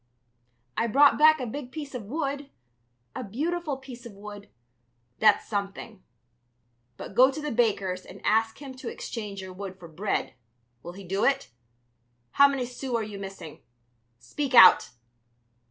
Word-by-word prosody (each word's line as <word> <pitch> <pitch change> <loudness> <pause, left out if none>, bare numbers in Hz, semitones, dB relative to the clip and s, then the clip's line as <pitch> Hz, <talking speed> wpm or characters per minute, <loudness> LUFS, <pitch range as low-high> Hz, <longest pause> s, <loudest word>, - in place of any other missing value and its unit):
"I 230 - 0
brought 280 +6 +5
back 310 0 +6
a 255 - -3
big 255 +2 -7
piece 290 -2 -7
of 240 -5 -6
wood, 280 +2 -4 0.7
a - - -4
beautiful 300 - -3
piece 260 -3 -11
of 235 -4 -10
wood...." 205 0 -11 0.7
"That's 215 -1 +4
something. 200 0 -5 1.0
But - - -9
go 255 +5 +6
to 275 - -5
the 300 -1 -4
baker's 200 -6 0
and - - -12
ask 225 +1 +2
him 275 -2 -9
to 255 -2 -6
exchange 205 -4 -6
your 185 0 -9
wood 190 0 -8
for 175 - -12
bread, 180 +6 -3 0.5
will 175 - -9
he 195 +2 -11
do 195 +2 -2
it? 275 0 +1 0.8
How 280 - +6
many 275 -3 -2
sous 250 0 -5
are 230 - 0
you 210 -2 -7
missing? 195 -5 -9 0.6
Speak 255 - -3
out!" 185 -5 +8
230 Hz, 155 wpm, -27 LUFS, 200-275 Hz, 1.0 s, out